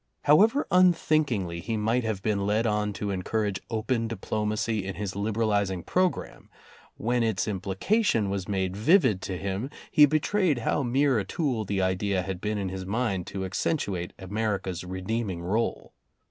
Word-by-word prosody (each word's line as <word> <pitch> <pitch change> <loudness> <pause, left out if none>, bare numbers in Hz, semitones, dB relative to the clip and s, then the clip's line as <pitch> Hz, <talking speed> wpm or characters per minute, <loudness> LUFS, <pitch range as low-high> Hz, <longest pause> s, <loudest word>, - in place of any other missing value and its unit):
However 215 - +5
unthinkingly 155 - +3
he 110 +6 -3
might 115 +4 +1
have 110 -4 -3
been 100 -2 0
led 110 +3 +1
on 105 -1 0
to 100 +1 -3
encourage 100 +1 -1
open 115 +1 -1
diplomacy 110 -1 -2
in 95 0 -5
his 100 -2 -4
liberalizing 100 -3 0
programme, 185 0 -1 0.5
when 120 +2 0
its 110 -3 0
implication 105 - +1
was 95 -2 -3
made 95 -2 -1
vivid 110 - +4
to 95 -2 -4
him, 100 +7 -3 0.2
he 150 -1 +7
betrayed 155 +2 +1
how 120 +5 0
mere 135 0 +2
a - - -1
tool 125 - -1
the 95 -1 0
idea 95 0 0
had 95 -1 -5
been 105 0 -1
in 100 -2 -2
his 95 0 -5
mind 100 -2 -1
to 95 -1 -4
accentuate 95 - -2
America's 95 -2 -2
redeeming 95 0 -3
role. 110 +6 -2
105 Hz, 155 wpm, -27 LUFS, 95-120 Hz, 0.5 s, he